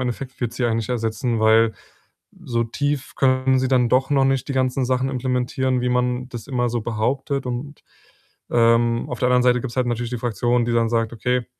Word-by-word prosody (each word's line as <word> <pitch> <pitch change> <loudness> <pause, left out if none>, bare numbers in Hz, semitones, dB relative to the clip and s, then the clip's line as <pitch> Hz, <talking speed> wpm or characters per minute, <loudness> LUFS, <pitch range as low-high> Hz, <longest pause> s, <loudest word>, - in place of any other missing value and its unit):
Endeffekt 130 +2 -5
wird 120 -1 -2
sie 125 - -2
einen 115 -1 +1
nicht 110 - -4
ersetzen, 115 0 -1
weil 110 0 +4 0.7
so 115 -1 -1
tief 145 +3 -3
können 130 0 +2
sie 130 0 0
dann 125 -2 +3
doch 130 +1 +2
noch 135 -1 +3
nicht 135 0 0
die - - -2
ganzen 130 0 +1
Sachen 130 +1 0
implementieren, 130 0 -1
wie 125 - 0
man 125 +1 0
das 120 0 -8
immer 125 -3 -1
so 120 -1 -1
behauptet“ 130 +5 -2
und, 130 +4 -6 0.7
ähm, 115 0 +3
auf 125 - -5
der 125 - +2
anderen 125 0 +3
Seite 125 -1 +3
gibt's 130 0 -6
halt 125 -1 +1
natürlich 120 0 -2
die 125 - -3
Fraktion, 120 +1 0
die 120 - -1
dann 115 -1 +2
sagt: 115 0 0
„Okay, 125 +2 -1
125 Hz, 205 wpm, -22 LUFS, 115-130 Hz, 0.7 s, weil